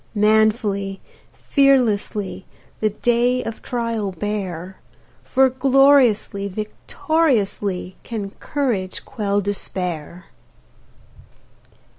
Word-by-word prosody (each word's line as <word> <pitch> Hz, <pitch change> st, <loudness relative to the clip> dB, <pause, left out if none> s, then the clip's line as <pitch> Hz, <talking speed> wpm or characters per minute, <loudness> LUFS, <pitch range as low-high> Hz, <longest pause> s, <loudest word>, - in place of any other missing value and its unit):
Manfuly, 210 Hz, -2 st, +2 dB, 0.3 s
fearlessly, 220 Hz, -9 st, +1 dB, 0.3 s
The 215 Hz, -, +2 dB
day 240 Hz, +4 st, +1 dB
of 225 Hz, -, -6 dB
trial 230 Hz, -5 st, -2 dB
bear, 190 Hz, -2 st, -4 dB, 0.5 s
For 265 Hz, 0 st, +3 dB
gloriously, 260 Hz, -6 st, +3 dB
victoriously, 210 Hz, -, -1 dB
Can 210 Hz, -4 st, -5 dB
courage 230 Hz, -10 st, -2 dB
quell 205 Hz, -5 st, -1 dB
dispair! 180 Hz, -4 st, -4 dB
210 Hz, 70 wpm, -21 LUFS, 195-250 Hz, 0.5 s, For